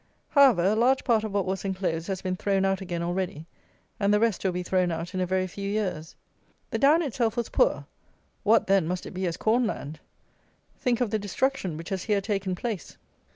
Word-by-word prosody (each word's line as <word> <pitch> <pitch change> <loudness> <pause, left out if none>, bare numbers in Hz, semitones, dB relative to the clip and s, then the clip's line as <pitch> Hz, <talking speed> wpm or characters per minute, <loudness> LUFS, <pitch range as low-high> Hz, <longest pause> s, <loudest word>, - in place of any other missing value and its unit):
However, 270 - +5
a 200 +4 +3
large 250 +4 +3
part 225 -3 +2
of 215 - -3
what 200 -2 0
was 190 0 -2
enclosed 185 -4 -2
has 190 -2 -3
been 185 -1 -1
thrown 195 0 +1
out 195 0 0
again 175 -2 -3
already, 175 -3 -3 0.5
and 200 -1 +2
the 210 - +4
rest 225 -3 +1
will 190 - +1
be 180 0 -3
thrown 185 0 +1
out 165 +3 -4
in 185 - -2
a 180 - 0
very 185 +1 +1
few 200 +2 -5
years. 185 -7 -3 0.6
The - - -1
down 300 +5 +5
itself 240 -4 -1
was 235 - -1
poor; - - +2 0.6
what, 220 +2 +4
then, 195 -4 +3
must 180 +1 -3
it - - -7
be 185 0 -2
as 165 - -3
corn 230 +2 +2
land! 155 -6 -5 0.8
Think 245 -1 0
of 235 -4 0
the 220 - +1
destruction 205 - -1
which 165 +1 -8
has 190 -2 -3
here 210 -2 +2
taken 195 -2 -2
place. 210 -4 -5
195 Hz, 215 wpm, -27 LUFS, 180-220 Hz, 0.8 s, However